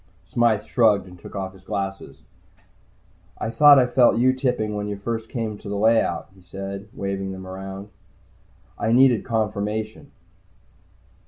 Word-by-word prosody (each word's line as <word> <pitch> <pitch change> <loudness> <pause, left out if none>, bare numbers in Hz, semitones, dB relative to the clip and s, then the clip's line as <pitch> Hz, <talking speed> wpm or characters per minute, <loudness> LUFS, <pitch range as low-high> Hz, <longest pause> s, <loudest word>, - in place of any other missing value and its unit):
Smythe 115 -3 +1
shrugged 105 -5 +3
and 90 -1 -14
took - - -11
off 95 -1 -4
his 95 - -17
glasses. 95 0 -5 1.1
"I 110 - -3
thought 145 +2 +7
I 130 - +5
felt 125 -1 +4
you 130 +2 +4
tipping 125 -5 -1
when 105 0 -3
you 100 -1 -4
first 115 +2 -4
came 110 -4 -4
to 105 - -9
the 100 - -3
layout," 110 -5 +2
he 95 - -20
said, 95 +3 -7
waving 95 -1 -4
them 95 0 -9
around. 95 +2 -8 0.9
I 110 - 0
nodded 125 -2 +5
confirmation. 110 +2 -3
105 Hz, 150 wpm, -23 LUFS, 95-115 Hz, 1.1 s, thought